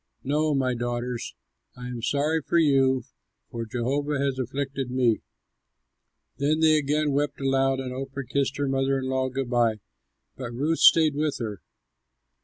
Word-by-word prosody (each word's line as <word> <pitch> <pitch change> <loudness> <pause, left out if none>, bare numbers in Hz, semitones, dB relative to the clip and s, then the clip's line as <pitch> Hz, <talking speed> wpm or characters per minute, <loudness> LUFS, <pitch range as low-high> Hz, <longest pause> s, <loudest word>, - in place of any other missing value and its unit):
No, 150 +2 +1
my 130 -2 +1
daughters! 120 0 -3 0.4
I 125 - -8
am 125 -1 -5
sorry 145 +6 0
for 170 - 0
you, 135 -5 +3 0.5
for 115 -1 -5
Jehovah 140 +6 -1
has 135 -1 -1
afflicted 135 +1 -3
me." 125 -3 +2 1.2
Then 150 +3 +1
they 160 -1 +5
again 150 +1 0
wept 145 +1 -1
aloud, 135 -1 +1
and 130 -1 -4
Orpah 135 +1 -5
kissed 140 +1 -1
her 145 -1 0
mother 135 0 +1
in 130 -1 -3
law 130 0 0
good 130 -1 -4
by, 120 -2 +3 0.6
but 125 -3 -6
Ruth 150 +7 0
stayed 160 -2 +6
with 150 0 -1
her. 105 -7 -5
135 Hz, 155 wpm, -26 LUFS, 125-145 Hz, 1.2 s, stayed